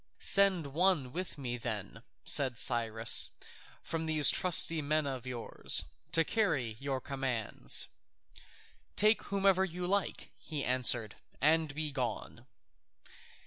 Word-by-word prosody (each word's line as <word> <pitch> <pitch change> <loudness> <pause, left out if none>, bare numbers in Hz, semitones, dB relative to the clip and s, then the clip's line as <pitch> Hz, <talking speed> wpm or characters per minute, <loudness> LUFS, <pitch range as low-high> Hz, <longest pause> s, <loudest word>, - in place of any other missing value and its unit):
"Send 195 -5 +4
some 140 - -10
one 165 -6 0
with 180 -1 -6
me 125 -3 -5
then," 115 -4 -6 0.2
said 130 -4 +2
Cyrus, 115 -3 +2 0.5
"from 160 0 -5
these 155 -2 +6
trusty 165 -2 +5
men 150 +1 -1
of 130 -3 -6
yours, 120 -2 0 0.3
to 165 -1 +2
carry 155 - -2
your 135 -1 -4
commands." 130 -5 -2 1.1
"Take 215 +2 +2
whomever 195 -1 +1
you 180 -1 -5
like," 200 +2 -3
he 150 -3 -5
answered, 120 -4 +1 0.2
"and 155 0 +1
begone." 135 -7 -5
145 Hz, 115 wpm, -31 LUFS, 125-175 Hz, 1.1 s, these